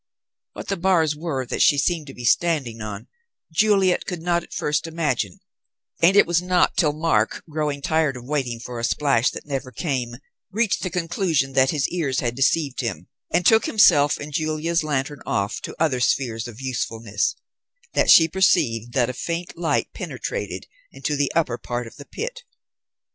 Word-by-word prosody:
What - - -8
the 195 - 0
bars 170 -4 +2
were 150 -5 -3
that - - -3
she 145 - +5
seemed 160 +1 0
to 135 - -10
be 125 - -7
standing 130 -5 +1
on, 105 -1 -6 0.5
Juliet 195 0 +3
could 175 -4 -5
not 175 0 +1
at - - -16
first 150 +3 -1
imagine, 150 - -2 0.6
and 175 +4 +5
it - - +7
was 170 0 +1
not 180 0 +2
till 155 -4 +3
Mark, 145 -8 0
growing 150 -2 -3
tired 155 -4 +1
of 120 - -10
waiting 130 -5 -2
for 120 0 -7
a - - -5
splash 135 -1 +2
that - - -9
never 135 -3 -4
came, 130 -6 -3 0.3
reached 215 +1 0
the 185 - -2
conclusion 165 -5 0
that 130 0 +4
his 145 -2 0
ears 145 -7 -1
had 120 -2 -1
deceived 135 +1 +1
him, 90 -8 -5 0.2
and 180 - +1
took 220 +2 +5
himself 150 -9 +5
and 145 0 -8
Julia's 155 +2 0
lantern 145 -1 -2
off 100 0 -2
to - - -7
other 155 -6 +1
spheres 120 -2 0
of 120 -1 -11
usefulness, 115 -5 -2 0.6
that - - +2
she 160 - +8
perceived 120 - +1
that 125 -3 +2
a - - -11
faint 170 +6 -4
light 170 -1 -1
penetrated - - -5 0.3
into 150 - -3
the 145 -1 0
upper 125 -8 +1
part 120 0 -4
of 115 - -12
the 145 - -10
pit. - - -6
145 Hz, 180 wpm, -23 LUFS, 125-170 Hz, 0.6 s, she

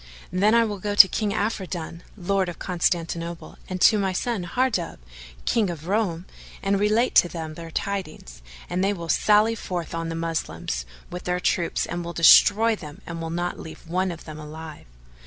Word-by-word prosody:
Then 200 +5 +3
will 205 -1 -4
I - - -16
go 205 +1 -2
to 200 - +10
King 210 +2 -1
Afridun, 190 -6 -3 0.2
Lord 190 0 0
of 175 - -7
Constantinople, 170 -1 -2
and 185 0 -3
to 215 - +6
my 190 -2 0
son 210 -1 -2
Hardub, 215 -4 -1 0.5
King 220 -5 +2
of 165 -2 -6
Roum, 185 -4 0 0.4
and 195 0 +1
relate 215 +4 +2
to 175 - +5
them 160 -2 -6
their 165 +1 -9
tidings 155 - -5 0.3
and 180 +1 -1
they 200 +1 +2
will 170 -4 -7
sally 210 +4 +4
forth 180 -7 -5
on 165 0 -3
the 165 - -4
Moslems 165 - -3 0.2
with 180 0 -7
their 180 0 0
troops 175 -1 0
and 175 0 -4
will 170 0 -6
destroy 215 +7 +6
them; 155 0 -11
and 170 -1 -6
will 165 - -4
not 175 +2 -3
leave 160 +1 -10
one 185 +3 0
of 170 -2 -8
them 155 -1 -8
alive." 155 - -9
175 Hz, 185 wpm, -24 LUFS, 165-200 Hz, 0.5 s, to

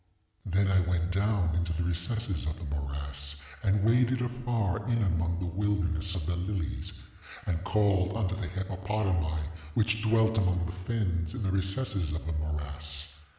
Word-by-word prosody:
ŌĆ£Then 95 +2 +3
I 95 - +5
went 90 0 +1
down 95 -3 +2
into 85 0 0
the 85 +2 -1
recesses 90 +1 0
of 80 - -2
the 85 - -7
morass, 70 0 -3 0.3
and 100 -1 +2
waded 125 +2 +4
afar 120 -4 -1
in 115 -2 +2
among 85 -2 +1
the 90 - -2
wilderness 90 -2 0
of 85 -4 -2
the 90 +1 0
lilies, 90 -1 -3 0.5
and 85 0 -1
called 100 0 +2
unto 95 -4 0
the 95 -2 -3
hippopotami 95 -3 -1 0.3
which 110 0 +2
dwelt 110 0 +4
among 90 -2 +2
the 85 - -3
fens 90 -3 -1
in 115 - -3
the 95 - +1
recesses 95 -3 0
of 80 - -4
the 80 - -2
morass. 75 0 -2
95 Hz, 160 wpm, -30 LUFS, 85-105 Hz, 0.5 s, I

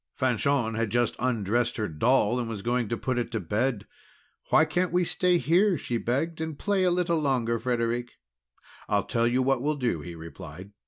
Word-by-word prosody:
Fanchon 125 -1 +1
had 115 -1 -1
just 120 +1 +1
undressed 120 -1 0
her 110 -2 -1
doll, 120 +7 +2
and 120 -2 -3
was 105 -4 -5
going 120 -2 0
to 115 - -1
put 130 +1 -1
it 120 -1 -3
to 115 - 0
bed. 105 +4 -1 0.6
"Why - - +5
can't 180 0 0
we 180 +1 +2
stay 180 +1 +2
here?" 180 +3 +3
she 120 -3 -2
begged, 155 +8 -1
"and 160 -2 -4
play 200 +1 +1
a - - +4
little 175 -2 +1
longer, 125 -5 0
Frederic?" 120 0 -1 0.8
"I'll - - +2
tell 115 0 +1
you 125 +2 +2
what 135 -1 +1
we'll 150 +3 0
do," 120 - -1
he 85 +2 -8
replied. 85 +3 -10
120 Hz, 195 wpm, -27 LUFS, 115-145 Hz, 0.8 s, Why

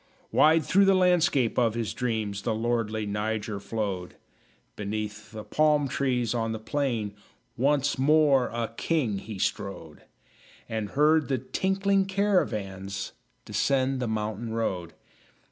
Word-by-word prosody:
Wide 155 0 +5
through 195 +1 +4
the 195 0 +5
landscape 170 -10 +3
of 115 -2 +2
his 115 -2 -2
dreams 110 -5 -2
The 110 0 -1
lordly 110 -1 -1
Niger 105 0 -2
flowed; 100 -4 -4 0.6
Beneath 105 +1 -5
the 110 -1 -7
palm 150 +5 +2
trees 125 -4 0
on 115 -1 -1
the 110 - -4
plain 115 -4 -2 0.4
Once 140 +2 +1
more 145 -2 +4
a 115 -1 -4
king 125 -13 0
he 105 0 -8
strode; 90 -5 -3 0.7
And 110 -2 -3
heard 155 +1 +4
the 135 - 0
tinkling 195 - 0
caravans 105 - -1 0.3
Descend 135 -1 +1
the 125 - -1
mountain 110 +1 -3
road. 95 -7 -2
115 Hz, 130 wpm, -27 LUFS, 105-145 Hz, 0.7 s, Wide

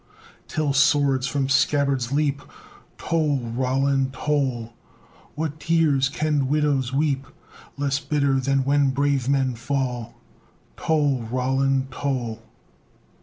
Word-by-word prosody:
Till 155 -3 -1
swords 140 -2 +3
from 135 -1 -1
scabbards 135 -2 +1
leap! 145 -1 0 0.6
Toll! 155 -4 0
Roland, 130 +2 0
toll! 130 -5 -1 0.6
What 155 0 -3
tears 155 -5 +2
can 145 -2 0
widows 145 -3 +1
weep 135 -1 0 0.5
Less 140 0 0
bitter 140 -3 +1
than 135 +1 +1
when 140 0 +2
brave 140 -1 0
men 135 -2 +1
fall? 125 -1 -3 0.6
Toll! 145 -5 +1
Roland, 135 +1 0
toll! 125 -5 -3
135 Hz, 105 wpm, -23 LUFS, 130-145 Hz, 0.6 s, swords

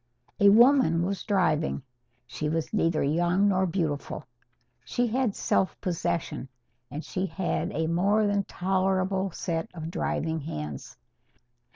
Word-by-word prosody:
A 200 - +7
woman 225 - +5
was 195 +1 -2
driving. 165 - +1 0.4
She 150 +4 -3
was 160 +3 -2
neither 165 -6 +2
young 175 +7 +2
nor 190 -1 +2
beautiful. 160 -5 -2 0.6
She 245 - 0
had 240 -2 0
self 190 - 0
possession, 170 -6 -2 0.4
and 150 +2 -6
she 185 +1 -2
had 175 +2 -2
a 160 +2 -1
more 195 +6 +2
than 200 -1 +1
tolerable 190 +1 0
set 165 -2 -3
of 160 0 -5
driving 160 -1 -1
hands. 75 - -6
180 Hz, 130 wpm, -27 LUFS, 160-195 Hz, 0.6 s, A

